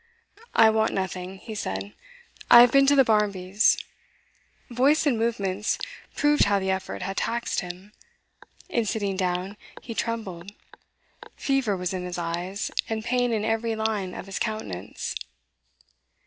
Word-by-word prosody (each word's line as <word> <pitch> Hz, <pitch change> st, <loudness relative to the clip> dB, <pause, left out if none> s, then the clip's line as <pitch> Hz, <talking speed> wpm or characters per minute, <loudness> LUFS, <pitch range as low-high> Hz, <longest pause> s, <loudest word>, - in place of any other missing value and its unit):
'I 220 Hz, -1 st, +7 dB
want 220 Hz, 0 st, +1 dB
nothing,' 190 Hz, 0 st, -4 dB
he 220 Hz, +3 st, -9 dB
said. 100 Hz, -, -4 dB, 0.6 s
'I've 240 Hz, 0 st, +9 dB
been 275 Hz, +1 st, +5 dB
to 285 Hz, -, +5 dB
the 270 Hz, -, +7 dB
Barmbys'.' 205 Hz, -2 st, +2 dB, 0.9 s
Voice 275 Hz, +7 st, +3 dB
and 280 Hz, -5 st, +3 dB
movements 210 Hz, -3 st, -1 dB, 0.4 s
proved 295 Hz, 0 st, +4 dB
how 200 Hz, 0 st, +3 dB
the 190 Hz, -1 st, 0 dB
effort 190 Hz, 0 st, -3 dB
had 195 Hz, 0 st, -4 dB
taxed 235 Hz, +1 st, -1 dB
him. 180 Hz, +4 st, -8 dB, 0.7 s
In 235 Hz, -, 0 dB
sitting 200 Hz, -2 st, -1 dB
down, 185 Hz, +2 st, -2 dB, 0.3 s
he 230 Hz, -, -6 dB
trembled; 200 Hz, -6 st, -4 dB, 0.8 s
fever 270 Hz, -8 st, 0 dB
was 180 Hz, 0 st, -2 dB
in 185 Hz, -1 st, -3 dB
his 180 Hz, 0 st, -5 dB
eyes, 175 Hz, +4 st, -3 dB, 0.2 s
and 220 Hz, -1 st, -3 dB
pain 245 Hz, 0 st, +1 dB
in 215 Hz, -2 st, 0 dB
every 225 Hz, 0 st, 0 dB
line 215 Hz, -4 st, -2 dB
of -, -, -7 dB
his 195 Hz, -1 st, -5 dB
countenance. 105 Hz, -, -4 dB
210 Hz, 140 wpm, -26 LUFS, 185-230 Hz, 0.9 s, I've